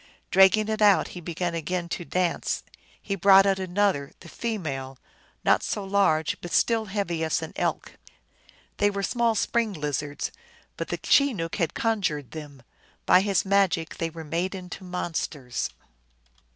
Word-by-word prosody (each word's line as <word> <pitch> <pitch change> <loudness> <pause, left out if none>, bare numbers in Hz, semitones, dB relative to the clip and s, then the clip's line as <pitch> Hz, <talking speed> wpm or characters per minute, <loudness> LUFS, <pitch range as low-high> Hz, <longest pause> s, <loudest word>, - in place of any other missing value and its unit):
Dragging 195 +3 +5
it 220 0 -2
out 205 -2 +5
he 180 - -8
began 170 +1 -3
again 170 +2 -2
to 175 - -3
dance. 180 0 -1 0.4
He 200 - -4
brought 195 +1 +6
out 195 -1 +2
another, 185 -6 0
the 170 - -12
female, 140 - -4 0.5
not - - +4
so 205 - -3
large, 190 -6 +2
but 175 - -7
still 225 -2 +2
heavy 190 -5 -2
as 160 0 0
an 160 - -7
elk. - - -3 0.8
They 205 - +3
were 200 -1 -3
small 235 +1 +1
spring 225 0 0
lizards, 145 -2 -3 0.4
but - - -4
the - - -3
Chenook 220 - +2
had 165 - -1
conjured 175 - -1
them; 145 -5 -9 0.4
by 185 - +6
his 200 -1 +1
magic 190 -4 +1
they 165 - -1
were 165 0 -9
made 175 +5 -2
into 185 0 -8
monsters. 160 -8 -3
180 Hz, 150 wpm, -26 LUFS, 160-200 Hz, 0.8 s, brought